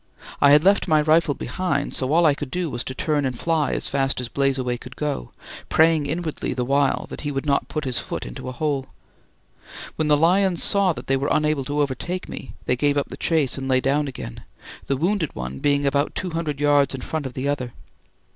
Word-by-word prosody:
I 145 - +7
had 150 +2 +6
left 195 +2 +4
my 155 -3 +4
rifle 155 -1 +3
behind, 170 -7 -2
so 130 +1 -1
all 170 +2 +4
I 150 - +5
could 145 -1 -6
do 175 0 -2
was 120 - -2
to 130 - -5
turn 150 0 0
and 130 -3 -2
fly 160 -1 0
as - - 0
fast 135 -1 0
as 125 -2 -4
"Blazeaway" 135 -3 0
could - - -11
go, 145 - -3 0.4
praying 160 -2 +4
inwardly 155 -3 -3
the 125 -1 -1
while 140 +1 +1
that - - -7
he 145 - -3
would 135 +1 -3
not 140 -1 +1
put 155 -1 -4
his 130 -2 -1
foot - - -5
into - - -7
a - - -4
hole. 140 0 -2 1.1
When 155 - 0
the 150 -1 +5
lions 180 +3 +3
saw 200 -2 +4
that - - -9
they 135 - +1
were 140 +2 -1
unable 150 -3 +1
to 145 +1 0
overtake 145 +7 -3
me, 130 - -8
they 125 - +2
gave 145 +3 +1
up 140 - -1
the - - -6
chase 145 -6 0
and 135 - -4
lay 130 -1 +3
down 140 +3 +1
again, 125 - -7 0.4
the 135 - 0
wounded 175 +1 0
one 65 +2 -5
being 145 0 +2
about 140 +1 +1
two 185 - -3
hundred 160 -4 -3
yards 145 -2 +3
in 130 - -7
front 155 -1 -3
of 125 - -10
the 135 +2 -2
other. 130 -4 -2
145 Hz, 225 wpm, -23 LUFS, 135-155 Hz, 1.1 s, I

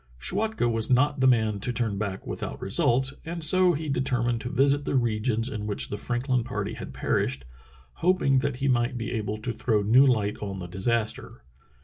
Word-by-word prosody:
Schwatka 215 - -1
was 115 -1 0
not 140 +3 +3
the 130 - +4
man 110 -4 +2
to 125 - -1
turn 110 -4 -1
back 100 -2 -4
without - - -5
results, 130 +3 +1
and 170 0 -5
so 185 +2 +5
he 155 +1 -4
determined 125 -4 0
to 125 - -4
visit 140 +3 +2
the - - -2
regions 115 -1 0
in 105 -5 -5
which 105 - -1
the - - -3
Franklin 120 +3 -1
party 120 - -4
had - - -8
perished, 65 0 -1 0.6
hoping 170 -7 +3
that 140 0 -1
he 135 +2 -2
might 120 0 +1
be 115 0 -4
able 105 -3 -3
to 115 +2 -4
throw 110 -4 0
new 125 +7 +5
light 105 -5 +1
on 100 -2 -4
the 90 - -6
disaster. 110 - -2
120 Hz, 195 wpm, -26 LUFS, 110-135 Hz, 0.6 s, so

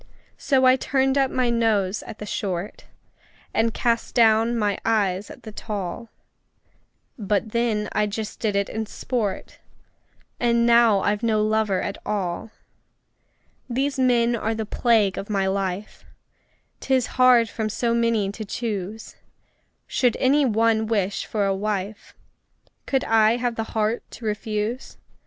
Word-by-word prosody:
So 265 -2 +2
I 255 0 +6
turned 265 0 +1
up 270 -1 +2
my 250 -2 0
nose 215 -4 +1
at 220 - -8
the 210 - -7
short, 190 -2 -4 0.7
And 225 +1 +2
cast 230 0 -1
down 230 0 +4
my 205 -3 0
eyes 205 -3 0
at - - -12
the 220 - -8
tall; 205 0 -5 1.1
But 205 +1 -1
then 225 -3 0
I 210 0 +1
just 210 +1 -5
did 210 -3 -1
it 200 0 +1
in 220 0 -4
sport 215 -4 -4 0.8
And 235 -1 +2
now 235 -4 +5
I've 205 +2 0
no 220 -2 +1
lover 215 -3 +1
at 200 - -4
all! 195 -1 -3 1.2
These 270 +3 -1
men 240 -2 +3
are 225 0 -2
the 220 0 -3
plague 215 -3 +2
of 195 - -7
my 195 -2 0
life: 190 +1 -3 0.8
'Tis 260 -2 +1 0.2
hard 245 -2 +6
from 220 -1 -3
so 230 +2 0
many 230 -4 +1
to 215 +2 -7
choose! 215 -1 -5 0.7
Should 245 -3 +1
any 280 +2 +3
one 225 -1 +2
wish 205 -3 -1
for 210 -2 -1
a 195 - +1
wife, 205 +1 -4 0.7
Could 270 -1 +1
I 220 0 +4
have 245 -1 -1
the 225 0 -5
heart 220 +2 +1 0.2
to 235 - -10
refuse? 215 +3 -3
220 Hz, 145 wpm, -23 LUFS, 205-235 Hz, 1.2 s, I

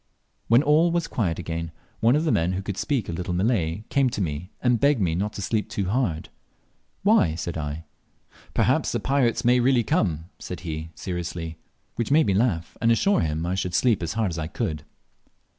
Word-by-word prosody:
When 120 +4 +5
all 155 +4 +4
was 170 -1 0
quiet 90 -9 -1
again, 85 0 -4 0.3
one 115 +4 +4
of 155 - +2
the 160 - +1
men, 85 +3 +1
who 95 +1 -3
could 100 -1 -4
speak 135 -9 -1
a - - -3
little 90 +1 -3
Malay, 95 -2 0
came 135 -2 +3
to 115 - -5
me 85 -1 -3
and 125 -2 +2
begged 140 0 +3
me 90 -5 +1
not 100 +5 -2
to 100 - -5
sleep 105 +2 -1
too 95 -2 -2
hard. 100 -9 -1 0.7
"Why?" 80 -1 +4
said 85 0 -4
I. 75 0 -4 0.7
"Perhaps - - +2
the - - 0
pirates 130 -3 +1
may 125 +1 +5
really 125 -1 +3
come," 80 -7 0
said 90 - -7
he 80 -4 -4
very 80 - -14
seriously, 85 -2 -5 0.4
which 115 - -1
made 155 +3 +5
me 100 - +2
laugh 95 -6 0
and 115 -1 +4
assure 200 - +3
him 80 +1 -1
I 90 - -1
should 90 -2 -2
sleep 120 -6 +3
as 85 -1 -2
hard 110 -4 0
as 85 - -4
I 80 - -3
could. 80 - -3
95 Hz, 210 wpm, -25 LUFS, 85-120 Hz, 0.7 s, When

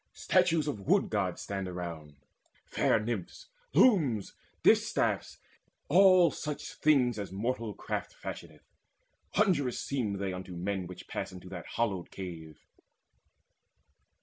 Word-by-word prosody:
Statues 170 -5 +2
of 140 -8 -2
Wood - - +3
gods - - -1
stand 95 -1 -4
around, 85 -5 -6 0.5
fair - - +2
Nymphs, 115 - -5 0.3
Looms, 145 - +4 0.3
distaffs, - - +2 0.5
all 180 0 +6
such 150 +1 -5
things 125 -7 +3
as 100 -2 -5
mortal 115 +2 -2
craft - - -4
Fashioneth. - - -9 0.7
Wondrous 170 - +2
seem 125 -7 -2
they 100 -1 -3
unto 90 0 -7
men 95 +1 -2
Which 90 - -10
pass - - -4
into 90 0 -10
that 90 -3 -7
hallowed 100 -7 -1
cave. 80 -5 -9
105 Hz, 120 wpm, -30 LUFS, 90-145 Hz, 0.7 s, all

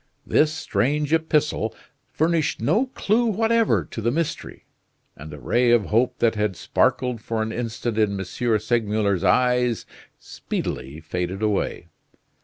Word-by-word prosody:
This 155 0 +3
strange 150 +2 -1
epistle 150 -8 +1 0.3
furnished 160 -1 0
no 215 - +2
clue 235 -1 +1
whatever 225 +1 +2
to 115 - -5
the 115 - +1
mystery; 160 +5 -3 0.5
and 75 +2 -10
the 75 - -8
ray 120 - +1
of 120 -3 +4
hope 120 +3 +2
that 115 -1 +2
had 105 -3 -1
sparkled 125 +6 0
for 110 0 -2
an 110 - -4
instant 115 -1 -3
in 100 -2 +1
M. - - -2 0.4
Segmuller's 105 -4 0
eyes 125 +4 +2 0.3
speedily 65 +5 -5
faded 90 +5 -4
away. 105 -2 -1
115 Hz, 135 wpm, -23 LUFS, 105-150 Hz, 0.5 s, of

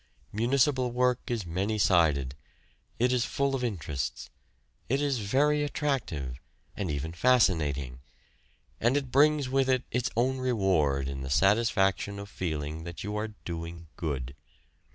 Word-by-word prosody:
Municipal 125 +3 +2
work 125 0 +2
is 115 -5 -2
many 95 +6 -1
sided: 75 -10 +3 0.6
it 125 +2 +2
is 125 -2 +2
full 140 +2 0
of 130 -2 -1
interests; 75 - -3 0.6
it 135 +3 +2
is 140 -4 0
very 145 +8 +2
attractive, 120 - -2 0.4
and 100 -4 -3
even 75 +2 -3
fascinating; 80 - +2 0.8
and 120 +5 +3
it 135 -3 -3
brings 145 0 +4
with 135 0 +1
it 130 -1 +2
its 120 -1 0
own 130 +2 +1
reward 95 - +1
in 70 -1 -5
the 65 - -5
satisfaction 100 - +2
of 100 0 -7
feeling 80 -3 -4
that 85 0 -7
you 105 +1 -4
are 105 0 -3
doing 85 -1 -6
good. 70 -7 -3
105 Hz, 140 wpm, -29 LUFS, 80-125 Hz, 0.8 s, brings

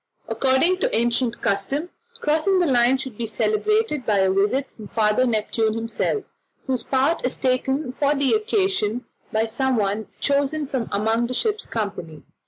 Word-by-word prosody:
According 270 +8 +2
to - - 0
ancient 235 +1 0
custom, 270 - -1 0.3
crossing 315 +6 +2
the 360 - +3
line 250 -2 +4
should 260 -5 -7
be 230 - -2
celebrated 425 - 0
by 215 -3 +1
a 190 -1 +3
visit 210 +8 +1
from 215 -2 -11
Father 215 +4 +2
Neptune 220 -1 0
himself, 230 - -2 0.4
whose 260 -2 -1
part 275 +5 +1
is 250 - 0
taken 265 +1 0
for 285 +2 +1
the 275 -1 +2
occasion 385 - 0 0.3
by 220 +1 +1
someone 220 -3 0
chosen 285 +2 +1
from 260 -4 -3
among 225 +3 +1
the 255 - -4
ship's 430 - -1
company. 195 -8 -5
255 Hz, 155 wpm, -23 LUFS, 220-295 Hz, 0.4 s, line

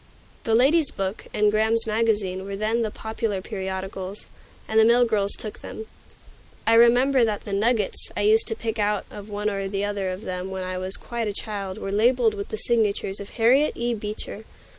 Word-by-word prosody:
"The 225 - +2
Lady's 280 +5 +4
Book" 195 +2 -4
and 210 0 +2
"Graham's 220 +2 +4
Magazine" 215 -4 0
were 195 0 -5
then 215 +3 0
the 220 - 0
popular 220 -1 -3
periodicals, 190 0 -6 0.4
and 220 - +2
the - - +7
mill 240 +2 +5
girls 205 -3 0
took 215 - -6
them. 220 - -8 0.8
I 225 - +4
remember 245 +3 +5
that 215 -2 -1
the 200 - -5
"nuggets" 215 0 0
I - - 0
used 215 +2 +3
to 225 - +3
pick 225 0 -4
out 210 0 0
of 205 +1 -9
one 205 0 -3
or 195 -2 -2
the 200 +1 -2
other 200 -2 -2
of 185 +3 -6
them 185 0 -4
when 190 -1 -4
I 185 0 -4
was 185 +1 +2
quite 235 -2 -4
a 205 - -2
child 200 -3 -4
were 195 - -5
labeled 230 +2 +3
with 200 -1 -6
the 215 - -4
signature 215 -4 0
of 200 - -8
Harriet 255 +6 +3
E. 240 0 -1
Beecher. 210 0 -6
210 Hz, 200 wpm, -24 LUFS, 195-230 Hz, 0.8 s, the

